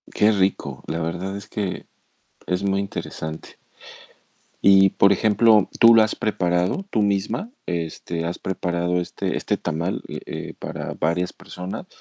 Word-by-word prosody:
Qué 105 +1 +3
rico, 95 -9 0
la 85 - -2
verdad 90 +4 -3
es 100 +1 -10
que 100 -3 -3 0.6
es 90 +1 -1
muy 100 0 +1
interesante. 80 -5 -6 1.1
Y 95 -1 +7
por 100 - +4
ejemplo, 110 +1 +4
¿tú 115 0 +8
lo 110 - +7
has 110 - -1
preparado, 90 - 0
tú 110 - +2
misma, 100 - 0 0.2
este, 85 0 -3
has 85 - -3
preparado 90 -1 -1
este 90 - -3
este - - -1
tamal, 85 +2 -2
eh - - -6
eh, - - -6
para - - -5
varias 85 +3 -1
personas 90 0 -7
95 Hz, 145 wpm, -23 LUFS, 85-100 Hz, 1.1 s, tú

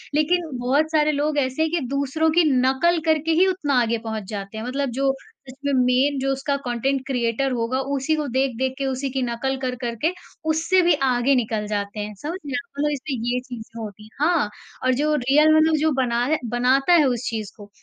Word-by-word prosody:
लेकिन 330 +2 +1
बहुत 280 +6 +1
सारे 305 -1 +3
लोग 295 +1 -1
ऐसे 260 +1 0
हैं 320 -1 +1
कि 345 - +1
दूसरों 280 +4 0
की - - +6 0.2
नकल 270 +7 +2
करके 315 0 +2
ही 380 - +6
उतना 290 -9 +1
आगे 230 0 0
पहुँच 220 -1 -3
जाते 200 0 -6
हैं, 220 - -4
मतलब 275 +2 -2
जो 270 -1 +3 0.3
इसमें 275 +2 -4
मेन 260 +3 +2
जो 270 +1 0
उसका 270 +1 -1
कंटेंट 260 +3 0
क्रिएटर 250 0 0
होगा 245 +1 -1 0.2
उसी 275 +4 0
को 305 -1 -2
देख-देख 260 0 0
के, 275 - -2
उसी 265 +1 -2
की 265 0 -2
नकल 250 +3 -2
कर 255 -1 -2
कर 235 -2 -2
के 330 - +3 0.4
उससे 325 +4 +3
भी 345 -1 +4
आगे 255 +2 +2
निकल 220 -3 -1
जाते 205 0 -3
हैं। 210 0 -4
समझ 325 +5 -4
रहे 285 - -6
हैं 285 - 0
आप 345 -5 -15
मतलब 295 +1 +1
इसमें 280 -1 -3
ये 250 - 0
चीज़ें 235 -3 -9
होती 210 -1 -8
हैं, 215 - -14
हाँ, 315 -8 +2 0.4
और 255 - +4
जो 300 +4 +1
रियल 300 +4 +4
मतलब 315 0 +4
जो 315 +1 +2
बना 240 -1 +1
रहा 315 - +2
बनाता 255 +7 +3
है 325 -4 +6
उस 250 -2 -1
चीज़ 215 -3 -4
को, 205 -1 -12
270 Hz, 220 wpm, -23 LUFS, 245-300 Hz, 0.4 s, की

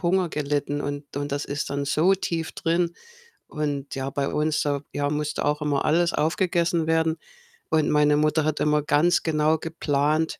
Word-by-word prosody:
Hunger 180 0 +1
gelitten 145 -1 -2
und 145 -1 -5
und 145 0 -3
das 145 +1 -2
ist 145 +1 -4
dann 140 0 -2
so 160 +7 +3
tief 165 -3 -3
drin. 170 +1 0 0.5
Und 145 -2 -4
ja, 135 0 -3
bei 140 0 -2
uns, 155 0 0
da 145 -1 -1
ja, 145 0 -1
musste 150 0 -2
auch 150 +1 0
immer 145 -2 0
alles 170 +2 +2
aufgegessen 170 0 +1
werden. 160 0 +1 0.5
Und 155 -1 +2
meine 150 0 +4
Mutter 155 +1 +2
hat 155 0 -1
immer 150 0 +2
ganz 150 +4 +3
genau 155 0 +2
geplant, 155 -1 0
150 Hz, 175 wpm, -24 LUFS, 145-160 Hz, 0.5 s, meine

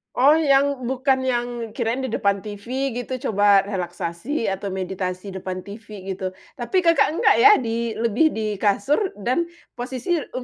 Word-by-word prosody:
Oh, 280 +4 +6
yang 280 -3 +2
bukan 265 0 +1
yang 245 -2 0 0.2
kirain 235 +3 -2
di 260 - -3
depan 200 -3 0
TV 240 +6 -3
gitu 255 0 -4
coba 200 -1 +5
relaksasi 180 - -4
atau 195 +1 -4
meditasi 185 0 -4
depan 185 -1 -5
TV 205 +2 -11 0.2
gitu. 190 -1 -4 0.2
Tapi 365 +10 0
Kakak 335 -2 +3
enggak - - +4
ya, 420 -1 +8
di 230 - -2
lebih 235 +7 +2
di 215 -2 -2
kasur 205 +7 +2 0.2
dan 250 - -1 0.2
posisi, 260 +7 -2
eee, 255 -3 -6
230 Hz, 155 wpm, -22 LUFS, 200-265 Hz, 0.2 s, ya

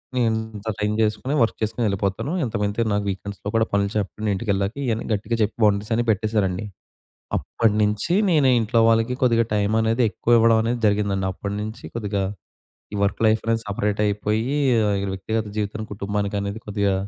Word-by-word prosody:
నేను 120 -2 +2 0.3
ఇంత 105 +2 -6
టైం 105 0 0
జేసుకొని, 110 +6 0
వర్క్ 110 - -1
జేసుకొనెళ్ళిపోతాను. 105 - -1
ఇంతకుమింతి 105 +1 -1
నాకు 100 0 0
వీకెండ్స్‌లో 100 +1 -6
గూడా 110 0 +4
పనులు 100 0 +2
చెప్పను 105 +1 -2
ఇంటికెళ్ళాక 100 0 -1
ఇయన్నీ 115 -1 -1
గట్టిగా 105 +3 -1
జెప్పి 105 - -2
బౌండ్రీసని 105 +3 +1
పెట్టేశానండి. 105 -3 0 0.7
అప్పటినించి 105 - +1 0.2
నేను 145 -5 +4
ఇంట్లో 115 +1 +1
వాళ్ళకి 115 +2 +2
కొద్దిగా 115 -2 +4
టైం 105 +1 +1
అనేది 115 +2 +1
ఎక్కువివ్వడం 115 -1 +4
అనేది 120 +1 -1
జరిగిందండి. 100 -2 +1
అప్పడి 100 +1 -5
నించి 110 +3 -6
కొద్దిగా 105 -3 -2 0.7
ఈ - - -2
వర్క్ 100 - -1
లైఫనేది 115 +1 +2
సపరేటైపోయీ, 105 +4 0 0.5
ఈ - - -2
వ్యక్తిగత 110 +3 -2
జీవితం 105 +1 -2
కుటుంబానికనేది 100 +1 -2
కొద్దిగా 100 -1 0
105 Hz, 140 wpm, -23 LUFS, 100-115 Hz, 0.7 s, గూడా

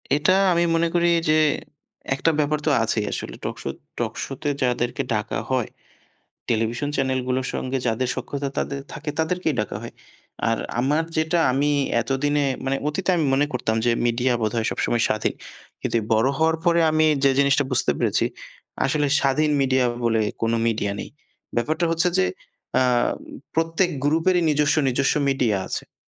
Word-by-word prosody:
এটা 150 +5 +3 0.2
আমি 170 0 +2
মনে 165 +1 +2
করি 175 0 +3 0.2
যে 155 - +5 0.8
একটা 165 +4 +2
ব্যাপার 150 0 +1
তো - - +3
আছেই 110 -1 0
আসলে - - -5
টকশো - - -4 0.3
টকশোতে 140 +2 -3
যাদেরকে 125 +1 0
ডাকা 105 0 -2
হয় 130 -3 0 0.8
টেলিভিশন 115 +4 0
চ্যানেলগুলোর 130 -1 0
সঙ্গে 130 +1 -2
যাদের 120 +2 0
সখ্যতা 140 +2 -4 0.4
থাকে 150 -1 -5
তাদেরকেই 160 -1 0
ডাকা 105 - -3
হয়। - - -8 0.6
আর 115 - +1 0.2
আমার 145 +5 +2
যেটা 160 +2 +1
আমি 140 +3 +1 0.3
এতদিনে 145 +4 0 0.2
মানে 135 +1 0
অতীতে 180 +5 -1
আমি 165 - +1
মনে 145 +2 +2
করতাম 110 -3 -1
যে 120 - +3 0.2
মিডিয়া 120 +2 +1
বোধহয় 110 +1 0
সবসময় 120 -1 0
স্বাধীন। 110 - 0 0.5
কিন্তু - - -1 0.2
বড়ো 110 +5 +3
হওয়ার 160 0 +3
পরে 170 -1 +4
আমি 155 0 +3 0.2
যে 135 - +6
জিনিসটা 140 +1 +3
বুঝতে 125 - +2
পেরেছি, - - +1 0.6
আসলে 145 +2 +1
স্বাধীন 150 +3 +2
মিডিয়া 130 -1 +2 0.2
বলে 115 -1 +2 0.2
কোনো 115 0 +2
মিডিয়া 105 -3 0
নেই। - - -7 0.5
ব্যাপারটা 155 +8 0
হচ্ছে 165 +2 +2
যে 190 - +4 0.5
আ - - +5 0.7
প্রত্যেক 165 +3 +1
গ্রুপেরই 165 +4 +2
নিজস্ব, 150 0 +2
নিজস্ব 130 +2 +1
মিডিয়া 125 -6 +1
আছে। - - -3
উম - - -65
135 Hz, 150 wpm, -23 LUFS, 120-155 Hz, 0.8 s, যে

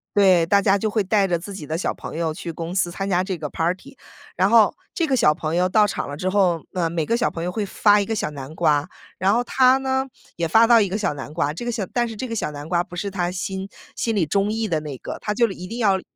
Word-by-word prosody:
对， 190 -4 +5
大 200 +4 +3
家 200 0 +3
就 215 +2 -1
会 215 +1 +1
带 200 0 +2
着 175 -2 +1
自 200 +4 -8
己 170 -6 -7
的 160 - -2
小 175 - -1
朋 - - -8
友 165 -2 -1
去 170 +1 -6
公 165 +1 -6
司 185 -2 +1
参 195 +3 -4
加 180 -1 +2
这 190 -1 -3
个 150 -2 -5
party。 185 - -3 0.4
然 190 +3 +2
后 225 -2 +5 0.2
这 335 - 0
个 270 - +2
小 150 -11 +4
朋 155 0 -3
友 180 +1 +2
到 210 +3 +4
场 195 - -4
了 145 - -6
之 185 +4 -1
后， 185 -4 +2
呃， 175 -3 0
每 165 -2 -1
个 230 - +1
小 240 0 +1
朋 165 - -5
友 180 - -2
会 210 +1 -2
发 205 +1 +3
一 - - -2
个 225 - -2
小 210 - -1
南 140 0 -8
瓜， 150 -3 +2 0.3
然 190 +2 +2
后 235 - +2
他 260 0 +4
呢， 265 0 -1 0.3
也 170 - -1
发 225 +8 +5
到 235 -1 +6
一 200 - +1
个 195 - -2
小 210 - -1
南 140 0 -8
瓜， 150 -2 0
这 170 - -7
个 240 - -2
小 220 -4 -2
但 240 -1 +1
是 225 - -7
这 255 - -4
个 230 - -4
小 150 - -2
南 145 0 -8
瓜 175 +1 +1
不 175 -1 -12
是 200 +2 -2
他 180 -3 -1
心 190 +1 -4 0.3
心 225 - -1
里 190 -5 +2
中 200 +6 0
意 225 0 -1
的 165 -5 0
那 145 -3 -6
个， - - -7
他 210 - -2
就 235 +2 +3
一 180 -1 -8
定 230 - -6
要 200 -5 +2
190 Hz, 325 characters per minute, -22 LUFS, 170-215 Hz, 0.4 s, 到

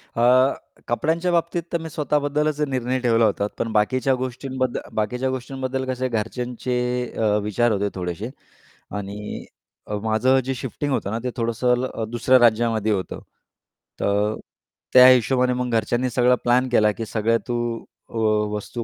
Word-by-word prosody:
अ, 125 +3 +4 0.3
कपड्यांच्या 165 +8 0
बाबतीत 170 0 0
तर - - +3
मी 160 - -6
स्वतःबद्दलच 150 -1 0
निर्णय 130 -1 -1
ठेवला 115 -2 +3
होता 100 -1 0
पण 115 - -1
बाकीच्या 130 +5 +2
गोष्टींबद्दल 130 0 -3 0.2
बाकीच्या 125 +5 -1
गोष्टींबद्दल 130 0 -3
कसं 130 0 -4
आहे 130 - +1
घरच्यांचे 125 +2 -4 0.4
अ, 105 -2 +2
विचार 110 +3 +1
होते 100 0 0
थोडेसे 90 +4 -4 0.7
आणि 100 +1 -6 0.4
अ, 105 - -3
माझं 125 +5 +3
जे 135 - -1
शिफ्टिंग 135 +4 -4
होतं 105 -6 -1
ना, 115 - -2
ते 125 - -1
थोडंसं 125 +2 +1
अ, 110 - -4
दुसऱ्या 125 +2 +3
राज्यामध्ये 110 -2 +3
होतं, 95 -3 -2 0.8
तर 105 +2 +1 0.6
त्या 125 0 +9
हिशोबाने 125 0 +4
मग 125 0 -2
घरच्यांनी 120 +4 0
सगळं 125 +1 +3
प्लॅन 125 +2 +3
केला 105 -3 +4
की 115 +2 -5
सगळ्या 110 +2 +1
तू 120 - -1 0.5
अ, - - -18 0.4
वस्तू 115 +3 -5
125 Hz, 150 wpm, -23 LUFS, 110-130 Hz, 0.8 s, त्या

